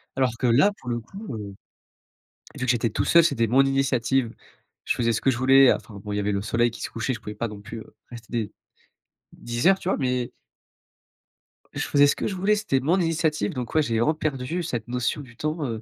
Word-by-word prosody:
Alors 130 -2 +2
que 125 - 0
là, 135 - +5
pour 125 - -8
le 120 -1 -1
coup. 195 - -8
Heu, 100 -2 -7 1.0
et - - -10
vu 125 - -1
que 125 - +3
j'étais 120 -1 0
tout 105 - -1
seul, 170 0 +6
c'était 115 -8 +2
mon 130 +5 +4
initiative, 135 -3 +1 0.5
je - - 0
faisais 115 -1 +1
ce 110 - -1
que 135 - +3
je 120 - -3
voulais, 135 +1 +6
heu, - - +5
enfin, 110 - -11
bon, 105 - -6
il - - -1
y - - 0
avait 105 0 0
le 100 - -1
soleil 115 +3 +1
qui - - -10
se - - -3
couchait 115 +3 -2
je 115 - -6
pouvais 105 0 -8
pas 115 - -2
non 105 -2 -9
plus, 115 +2 -8
heu, - - -15 0.2
rester 115 -3 -11
des 115 -4 -2 0.8
10 120 +3 -3
heures, 195 - +4
tu 180 - -5
vois? - - +2
Mais 125 -2 -1 1.4
je - - -2
faisais 145 0 +5
ce - - +2
que - - -3
je 195 - -3
voulais 195 +3 +2
c'était 205 -11 0
mon 165 +8 +1
initiative, 160 - 0
donc, 125 -2 -5
ouais, 155 - +5
j'ai 115 -4 -1
vraiment 150 +7 +3
perdu 155 +2 -3
cette 120 -7 -4
notion 125 +4 -1
du 125 -4 -14
temps, 155 +1 -2
heu, 115 -4 -4
125 Hz, 245 wpm, -24 LUFS, 115-145 Hz, 1.4 s, seul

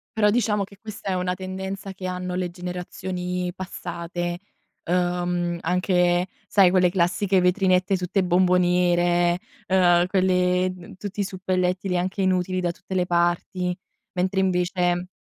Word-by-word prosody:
Però, 210 -1 +4
diciamo, 210 -3 +1
che 200 0 -11
questa 210 -2 -7
è - - +1
una 180 0 -1
tendenza 190 +1 -5
che 185 -1 -6
hanno 180 0 -4
le 180 0 -1
generazioni 180 0 -4
passate, 175 -1 -5 0.4
ehm, 175 -1 0
anche 180 0 +2 0.2
sai 195 -3 +5
quelle 180 -1 +4
classiche 185 +2 +2
vetrinette 185 +1 +2
tutte 180 +2 0
bomboniere, 175 -1 +3 0.3
ehm, 175 -2 +4
quelle 185 -1 +2
d 180 0 -12
tutti 205 +1 -7
i 200 - +3
suppellettili 185 0 -1
anche 190 +3 -2
inutili 185 0 +1
da 175 -1 0
tutte 190 +1 -8
le 180 - +2
parti. 175 +1 0 0.4
Mentre 185 +1 0
invece 180 -1 +1
180 Hz, 135 wpm, -24 LUFS, 175-185 Hz, 0.4 s, sai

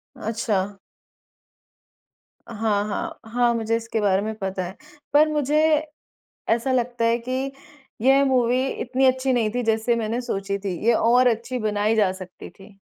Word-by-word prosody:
अच्छा। 205 -3 -2 1.7
हाँ, 215 -3 0
हाँ, 330 +10 -4
हाँ, 240 0 +2
मुझे 230 0 0
इसके 225 -1 -3
बारे 195 -1 +2
में 220 +1 -3
पता 190 -2 -3
है। 185 - -9 0.4
पर 305 +1 +6
मुझे 300 0 +1 0.9
ऐसा 235 +4 +1
लगता 245 -2 0
है 230 +1 +3
कि 265 +1 -2 0.5
यह 270 +2 +5
मूवी 255 -1 +2 0.2
इतनी 260 +2 +1
अच्छी 260 0 +2
नहीं 230 -3 +1
थी 245 - 0
जैसे 225 +1 +1
मैंने 230 +2 -2
सोची 200 -4 -3
थी, 195 -2 -3
ये 235 - +5
और 245 +3 +4
अच्छी 240 +2 -1
बनाई 215 0 0
जा 205 -4 +3
सकती 185 -1 -10
थी। 195 0 -17
230 Hz, 155 wpm, -23 LUFS, 210-255 Hz, 1.7 s, पर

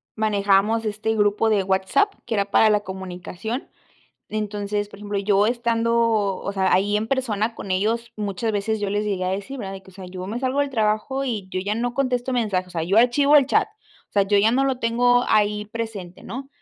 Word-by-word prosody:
manejábamos 210 +1 +2
este 215 +1 -1
grupo 210 +1 +2
de 205 -3 +2
WhatsApp 190 - +1
que - - -3
era 200 -1 +1
para 220 - +5
la 210 -1 +3
comunicación. 190 +5 -6 0.6
Entonces, 205 -1 -2
por 200 - -13
ejemplo, 205 -1 -3
yo 200 +1 +3
estando, 235 -1 +1 0.4
o 200 - -4
sea, 190 -1 +1
ahí 205 +3 +3
en 215 +1 -1
persona 230 -4 -1
con 195 - -8
ellos, 225 +5 0
muchas 210 +2 -2
veces 215 +1 -1
yo 205 - -1
les 205 +1 0
llegué 190 -3 -1
a - - 0
decir, 200 +8 -4
¿verdad?, 195 -3 -5
de 190 - -9
que, 190 - -16
o - - -22
sea, 190 -2 -9
yo 185 0 -7
me 230 +5 -4
salgo 265 +2 0
del 285 -1 0
trabajo 220 +4 0
y 215 -7 -3
yo 185 - -2
ya 205 +2 -1
no 240 +1 -1
contesto 255 -1 0
mensajes, 205 -7 0
o - - -16
sea, 165 -2 -3
yo 190 +6 0
archivo 280 +5 +5
el 275 -3 +5
chat, 425 +7 +2 0.4
o - - -52
sea, 200 - +4
yo 200 +1 +2
ya 215 +3 +4
no 270 +2 +2
lo 265 -2 0
tengo 245 +1 +3
ahí 210 0 +2
presente, 210 -5 -6
¿no? 270 +3 -7
210 Hz, 220 wpm, -23 LUFS, 200-235 Hz, 0.6 s, para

